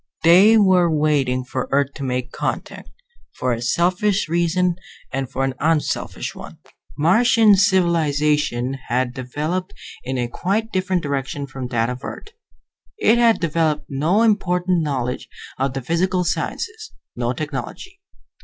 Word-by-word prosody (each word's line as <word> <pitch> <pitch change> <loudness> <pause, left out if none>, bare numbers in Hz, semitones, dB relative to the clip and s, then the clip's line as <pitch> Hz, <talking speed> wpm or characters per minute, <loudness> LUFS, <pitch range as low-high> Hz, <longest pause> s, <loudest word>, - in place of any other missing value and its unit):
They 190 +7 +7
were 185 -4 +4
waiting 145 -5 +1
for 130 0 -4
Earth 140 0 +1
to 140 - -7
make 125 -1 -3
contact, - - -4 0.5
for 130 -1 0
a 115 - -4
selfish 180 - +1
reason 175 +1 +1 0.4
and 135 -1 -2
for 135 0 -2
an 135 -1 0
unselfish 155 0 -1
one. - - -11 0.4
Martian 215 +6 +5
civilization 150 - +1
had 125 0 0
developed 155 +9 -4 0.3
in 130 +1 -3
a 120 -1 -1
quite 205 - -2
different 185 -1 -1
direction 140 0 -3
from 130 -2 -6
that 115 -2 0
of 125 0 -8
Earth. 415 - -8 0.7
It 240 - +3
had 230 -2 +4
developed 155 -2 0
no 160 +11 +1
important 180 -5 +1
knowledge 130 -5 -3 0.3
of 135 0 0
the 135 -1 -4
physical 180 +5 0
sciences, 435 - -3 0.2
no 120 0 -1
technology. 155 - -6
155 Hz, 135 wpm, -21 LUFS, 135-185 Hz, 0.7 s, They